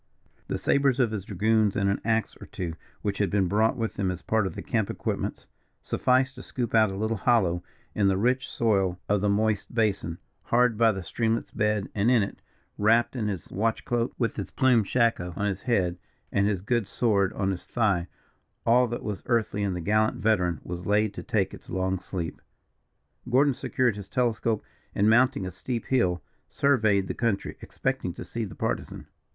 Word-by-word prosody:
The - - -2
sabres 140 -2 +2
of 120 -4 +3
his 100 -4 -4
dragoons, 110 -1 +2
and 100 - +1
an 100 - 0
axe 110 -1 0
or - - -9
two, 85 -3 -4 0.3
which 100 -2 -2
had 100 - +2
been 100 -3 +2
brought 110 +4 +2
with 115 -2 -3
them 95 -2 0
as 90 -1 -5
part 110 -3 +1
of 85 - -7
the - - -6
camp 110 -4 0
equipments, - - -3 0.4
sufficed 130 +1 +2
to 125 - -10
scoop 120 -3 -4
out 110 -2 +5
a 95 - -5
little 110 +3 -1
hollow 95 -6 +2 0.3
in 100 -2 +2
the 95 -1 +2
rich 125 +5 +1
soil 95 -5 +1
of 105 -1 +2
the 105 - +2
moist 105 +1 0
basin, 100 -7 0 0.3
hard 125 -1 +3
by 115 +1 +4
the 95 -3 -5
streamlet's 115 +5 -1
bed, 105 -2 0
and 105 +3 +2
in 120 -4 +4
it, 100 - -6 0.4
wrapped 115 +4 +3
in 110 -4 -1
his 95 -6 -5
watch 110 +3 -1
cloak, 120 0 0
with 115 -2 -1
his - - -4
plumed 125 -6 +3
shako 115 -8 +1
on 100 - -1
his 100 -2 -2
head, 90 -8 0 0.3
and 100 0 +2
his 100 -4 0
good 120 -1 0
sword 100 -4 +1
on 95 -1 0
his 90 - -6
thigh, 100 -7 +1 0.6
all 125 +2 +5
that 120 +1 -5
was 105 -3 -4
earthly 110 -4 +1
of 95 -2 -1
the 90 - -4
gallant 110 +4 +2
veteran 90 -7 +1
was 90 +1 -6
laid 105 0 +2
to - - -6
take - - 0
its - - -12
long 95 +1 -1
sleep. 85 -4 -5 0.9
Gordon 135 +3 +4
secured 125 -2 0
his 100 -2 -9
telescope, 115 -2 0 0.3
and, 100 - +3
mounting 125 0 +4
a 95 - -4
steep 115 +6 -4
hill, 90 -10 +1 0.3
surveyed 110 -8 +2
the - - -3
country, 115 -5 -1
expecting - - -3
to - - -7
see 115 - -4
the 95 - -9
Partisan. - - -3
105 Hz, 195 wpm, -27 LUFS, 95-115 Hz, 0.9 s, out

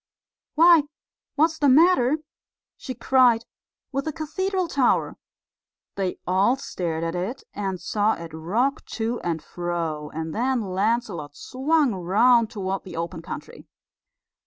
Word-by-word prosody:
"Why, 335 +1 +7 0.5
what's 320 +2 +2
the 285 - +4
matter," 300 -2 +5 0.6
she 255 - -7
cried, 245 -2 +3 0.5
"with 275 0 -2
the 315 - -1
cathedral 370 +4 -2
tower?" 275 -5 +1 0.8
They 190 -2 -2
all 190 +7 +3
stared 170 -11 -4
at 165 0 -2
it, 195 +10 -4
and 195 -2 -3
saw 210 +4 +1
it 165 -1 -9
rock 225 - -1
to 230 +1 -1
and 165 -2 -3
fro; 165 -4 -3
and 160 0 -5
then 250 +2 0
Lancelot 195 -5 -1
swung 280 0 +1
round 215 +6 +3
toward 195 -2 -3
the 180 - -9
open 170 0 -4
country. - - -9
225 Hz, 130 wpm, -24 LUFS, 175-270 Hz, 0.8 s, Why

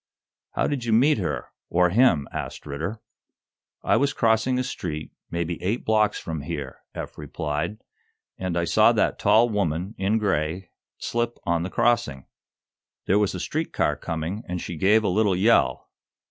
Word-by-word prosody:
"How - - +1
did 140 -4 -1
you 115 -2 0
meet 130 +3 +4
her 90 - -3 0.2
or 90 0 +3
him?" 95 - +4
asked - - -6
Ridder. 80 +10 -4 0.8
"I - - +3
was 140 0 +1
crossing 115 +2 +2
a 130 - +1
street, 80 -10 -5 0.2
maybe 85 0 -3
eight 100 +7 -1
blocks 110 -1 +2
from 80 -3 -5
here," 70 - -5 0.2
Eph - - -7
replied, 75 +5 -3 0.6
"and 90 -2 -3
I 85 - +1
saw - - +5
that - - +1
tall 110 +4 +5
woman, 95 -2 -1
in 100 +3 +2
gray, 90 -3 -1 0.3
slip 120 0 -2
on 85 -1 +1
the 90 - -3
crossing. 115 - +1 0.8
There 100 +3 +3
was 105 -3 +1
a - - -4
street 155 - -3
car 75 - +1
coming, 80 +7 -4
and 90 0 -3
she 85 - -5
gave 105 +7 +4
a - - +1
little 100 0 +2
yell. 110 +6 +2
95 Hz, 165 wpm, -25 LUFS, 85-110 Hz, 0.8 s, saw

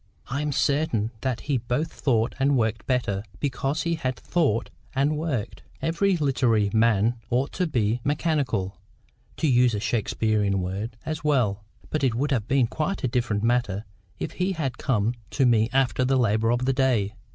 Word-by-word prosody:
I 140 +3 -1
am 150 0 -1
certain 140 -6 +1
that 130 -3 -1
he 140 -3 0
both 125 +7 -2
thought 115 -3 +1
and 135 0 +3
worked 110 -2 -1
better, 120 -7 0 0.2
because 135 +2 -1
he 170 -1 0
both 130 -1 -1
thought 150 - 0 0.2
and 140 +3 +2
worked. 150 -8 -3 0.2
Every 180 +3 +1
literary 125 -8 +2
man 115 +1 +3
ought 130 +4 0
to 180 - -1
be 120 -4 0
MECHANICAL 145 - 0 0.6
(to 160 - +1
use 125 -3 +4
a - - -1
Shakespearean 105 -2 0
word) 100 +6 -4
as 155 -1 -4
well. 120 -9 +1 0.3
But 155 - -1
it 125 -4 +2
would 145 +5 0
have 115 -5 0
been 135 -2 +3
quite 155 +10 -3
a - - +2
different 115 -4 -1
matter, 115 -4 +1 0.3
if - - -4
he 185 +1 -1
had 135 -7 -3
come 115 -4 +1 0.2
to 135 - +1
me 115 -2 +4
after 130 -1 +2
the 130 +1 +2
labour 115 -2 +2
of 120 +1 +1
the 135 - +2
day. 125 -7 +1
125 Hz, 175 wpm, -25 LUFS, 110-145 Hz, 0.6 s, use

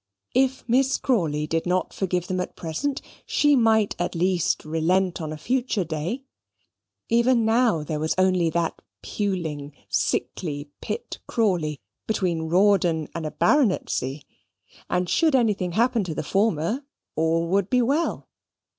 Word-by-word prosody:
If 265 0 +1
Miss 260 +3 +3
Crawley 160 - 0
did 165 +2 -1
not 180 +1 0
forgive 180 -2 -1
them 185 0 -2
at 180 - -4
present, 180 - -3 0.2
she 295 -1 +3
might 220 -4 +3
at 175 0 -2
least 180 -1 +1
relent 170 +4 +1
on 155 -1 -4
a 155 - -5
future 240 - 0
day. 165 - -4 0.8
Even 235 0 +3
now, 225 -8 +3
there 150 0 -3
was 155 +1 0
only 185 -2 +3
that 165 0 -2 0.2
puling, 160 -8 -3 0.2
sickly 145 -4 -2
Pitt 470 - -5
Crawley 175 - 0 0.3
between 175 -7 -1
Rawdon 175 -4 +3
and 165 -2 -3
a - - -5
baronetcy; 180 - +1 0.7
and 180 0 0
should 315 - +3
anything 205 -8 +1
happen 230 +1 +2
to 160 -3 -4
the - - -2
former, 200 - 0 0.3
all 165 +1 +1
would 195 +1 +1
be 250 -1 +3
well. 290 +7 0
185 Hz, 140 wpm, -24 LUFS, 160-230 Hz, 0.8 s, Miss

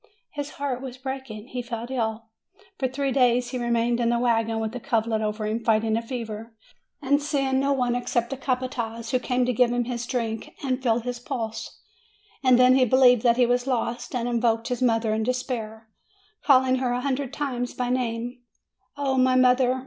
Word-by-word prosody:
His 290 -1 -5
heart 275 -3 -2
was 260 -2 -7
breaking. 265 -4 -6
He 250 - -4
fell 235 -1 -5
ill; 225 -3 -2 0.5
for 260 - +1
three 270 +1 -2
days 245 -2 +3
he 255 - -3
remained 235 0 +1
in 235 -1 +2
the 235 - +2
wagon, 225 -2 +1
with 220 +1 -3
a - - -3
coverlet 225 -3 0
over 215 0 -2
him, 220 +2 -2
fighting 220 -1 +2
a 230 - 0
fever, 225 -2 -6 0.5
and 285 +2 +2
seeing 275 -2 0
no 275 +1 +1
one 250 -3 +1
except 240 0 -1
the - - -1
capataz, 250 -3 -3
who 255 - +2
came 250 0 0
to 250 - 0
give 245 +1 +3
him 245 0 +1
his 240 0 -4
drink 225 -4 -3
and 260 -1 -1
feel 235 -2 +2
his 245 +1 -4
pulse. 230 -4 -5 0.6
And 255 -2 +6
then 255 0 +6
he 260 - +5
believed 250 -1 +5
that 235 0 +3
he 250 - +5
was 245 +1 0
lost, 245 -1 -2
and 240 -1 -1
invoked 230 -1 +1
his 250 -1 -2
mother 225 -3 +2
in 220 - 0
despair, 225 -2 -3 0.6
calling 260 -2 +4
her 250 -1 0
a 245 - -1
hundred 270 -1 -2
times 255 -4 -3
by 250 -1 -1
name: 245 0 -2 0.6
"O 270 -2 0
my 255 0 +4
mother! 255 0 +4
245 Hz, 195 wpm, -25 LUFS, 230-255 Hz, 0.6 s, And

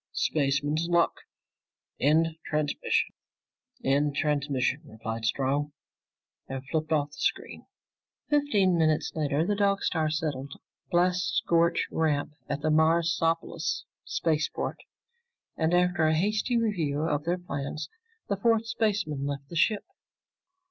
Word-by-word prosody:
"Spaceman's 145 +2 +1
luck! 170 -1 +3 0.9
End 160 +4 +4
transmission." 150 -1 0 0.7
"End 145 +2 +2
transmission," 140 -2 0
replied 115 -3 -5
Strong 140 +5 0 0.7
and 135 0 -6
flipped 155 0 -1
off 145 -2 +2
the 145 - -14
screen. - - -2 0.6
Fifteen 210 - +3
minutes 155 -1 +2
later, 150 0 0
the 205 - +1
Dog 200 -1 +2
Star 160 -2 +1
settled 145 -3 -3
on - - -18
a - - -53
blast 180 +1 +2
scorched 170 0 +2
ramp 150 -2 0 0.2
at 145 0 -2
the 155 - +1
Marsopolis 165 +1 +1 0.2
spaceport, 155 -1 -1 0.8
and 160 0 +1
after 175 -2 +3
a 160 - +3
hasty 210 +6 +1
review 165 -10 0
of 150 -2 -1
their 175 +2 +1
plans, 145 -3 -5 0.4
the 200 - -1
four 225 +3 +4
spacemen 205 -11 -1
left 140 -1 -5
the 170 - -8
ship. 205 +5 +2
155 Hz, 125 wpm, -28 LUFS, 145-175 Hz, 0.9 s, End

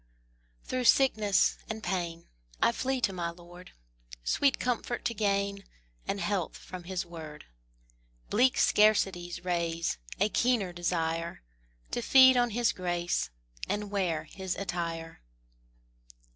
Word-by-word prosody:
Through 255 -1 -2
sickness 215 -7 +4
and 220 0 -5
pain 170 -2 -3 0.3
I - - +4
flee 260 +2 -1
to 195 - +1
my 175 -2 -2
Lord, 175 +1 -13 0.5
Sweet 275 - +2
comfort 245 -1 -2
to 235 - 0
gain, 200 -1 0 0.4
And 200 - -1
health 195 -4 -1
from 180 -1 -9
His 185 0 -3
word; 160 -3 -9 0.9
Bleak 250 +4 +4
scarcities 190 -5 +2
raise 170 - -1 0.2
A 205 +2 +3
keener 225 -6 +1
desire, 165 - -2 0.5
To 240 - -1
feed 260 +1 +7
on 245 -1 +3
His 235 +1 +2
grace, 175 -1 -1 0.4
And 205 0 -2
wear 175 -6 0
His 190 +3 -5
attire. 170 -3 -4
190 Hz, 120 wpm, -30 LUFS, 175-220 Hz, 0.9 s, feed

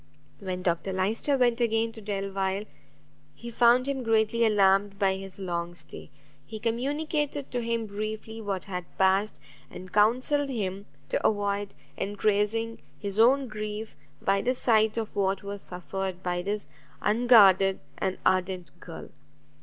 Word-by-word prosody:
When 185 -2 -4
Dr 180 +2 0
Lyster 215 +9 +1
went 245 -1 +2
again 225 -1 +1
to 225 -1 -11
Delvile, 195 -1 -2 0.7
he 235 0 -8
found 240 +2 +4
him 275 -1 -1
greatly 225 0 +2
alarmed 200 -2 +3
by 195 -2 +2
his 195 -1 -9
long 175 -2 -3
stay; 160 -2 -7 0.3
he 220 +8 -8
communicated 285 +5 -1
to 245 - -1
him 230 -1 -1
briefly 215 +2 -5
what 195 -3 -3
had 180 -3 -5
passed, 195 +2 +2 0.3
and 185 0 -10
counselled 255 +7 +3
him 200 -5 -3 0.2
to - - -1
avoid 205 -1 0 0.2
encreasing 210 +3 0 0.2
his 200 0 -4
own 260 +4 +5
grief 215 0 -5 0.2
by 195 0 +1
the 255 +4 0
sight 220 -3 +3
of 220 -2 -3
what 195 -1 0
was 200 0 -6
suffered 185 +1 -5
by 175 0 -1
this 205 +3 -3 0.4
unguarded 205 -4 +5 0.2
and 190 -1 -1
ardent 185 -1 +1
girl. 165 -3 -9
210 Hz, 140 wpm, -27 LUFS, 190-230 Hz, 0.7 s, own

